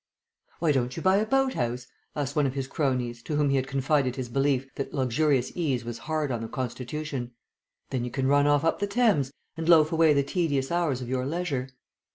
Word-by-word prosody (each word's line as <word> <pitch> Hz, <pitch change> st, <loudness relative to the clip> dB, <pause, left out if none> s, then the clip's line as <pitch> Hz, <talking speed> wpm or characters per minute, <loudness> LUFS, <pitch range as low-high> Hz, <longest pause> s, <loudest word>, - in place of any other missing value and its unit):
"Why 160 Hz, -2 st, +2 dB
don't 130 Hz, -1 st, 0 dB
you 165 Hz, -, -4 dB
buy 190 Hz, +1 st, +4 dB
a 215 Hz, -, +2 dB
house 125 Hz, -, 0 dB
boat?" -, -, -29 dB, 0.3 s
asked 145 Hz, -2 st, -2 dB
one 150 Hz, -2 st, +3 dB
of 130 Hz, -, -4 dB
his 135 Hz, -1 st, -2 dB
cronies, 125 Hz, -4 st, -1 dB
to 150 Hz, -, -4 dB
whom 145 Hz, -1 st, +2 dB
he -, -, +2 dB
had 130 Hz, -1 st, 0 dB
confided 135 Hz, -1 st, +1 dB
his 130 Hz, -3 st, -4 dB
belief 135 Hz, +1 st, +1 dB
that 140 Hz, -, -5 dB
luxurious 135 Hz, 0 st, +1 dB
ease 135 Hz, -9 st, -1 dB
was 120 Hz, -1 st, -5 dB
hard 155 Hz, -3 st, 0 dB
on 120 Hz, -2 st, -2 dB
the 115 Hz, -, -4 dB
constitution. 130 Hz, +1 st, -4 dB, 0.6 s
"Then 130 Hz, -3 st, -1 dB
you 125 Hz, -, -3 dB
can 130 Hz, +2 st, -2 dB
run 145 Hz, +1 st, +4 dB
off 145 Hz, 0 st, +3 dB
up 165 Hz, -, +1 dB
the 205 Hz, -, 0 dB
Thames, 200 Hz, -, +2 dB, 0.2 s
and 165 Hz, +1 st, -3 dB
loaf 155 Hz, -2 st, +6 dB
away 160 Hz, -2 st, +5 dB
the 140 Hz, -1 st, +2 dB
tedious 140 Hz, -3 st, -1 dB
hours 165 Hz, -7 st, 0 dB
of -, -, -7 dB
your 130 Hz, +1 st, -1 dB
leisure." 145 Hz, -5 st, -2 dB
140 Hz, 215 wpm, -27 LUFS, 130-155 Hz, 0.6 s, loaf